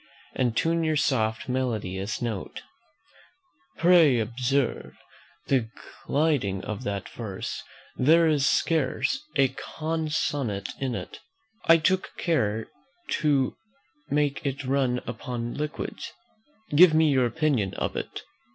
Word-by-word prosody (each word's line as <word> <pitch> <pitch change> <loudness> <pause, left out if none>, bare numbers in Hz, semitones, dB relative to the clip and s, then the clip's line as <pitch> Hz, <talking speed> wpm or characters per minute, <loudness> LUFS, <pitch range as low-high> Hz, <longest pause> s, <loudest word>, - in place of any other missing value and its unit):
"'And 120 -3 0
tune 165 0 +2
your 155 -1 +1
soft 110 -6 0
melodious 110 -5 -2
notes,' 110 -5 -4 1.1
"Pray 165 -6 +6
observe 125 +4 -1 0.5
the 125 -5 +1 0.4
gliding 140 -11 +1
of 110 +2 -5
that 100 -2 -3
verse; 100 -5 -5 0.3
there 165 +6 +5
is 150 -3 +2
scarce 160 - +1
a 135 -1 +4
consonant 150 -11 -2
in 130 -3 -2
it: - - -7 0.5
I 165 - +7
took 185 +4 0
care 110 -10 0 0.5
to 140 -4 +2 0.5
make 145 -1 0
it 140 0 -3
run 130 -2 +1
upon 120 0 -4
liquids. 150 +1 -5 0.6
Give 165 0 +8
me 160 -1 +4
your 130 -3 +3
opinion 135 - 0
of - - -2
it." - - -5
135 Hz, 115 wpm, -26 LUFS, 115-155 Hz, 1.1 s, Give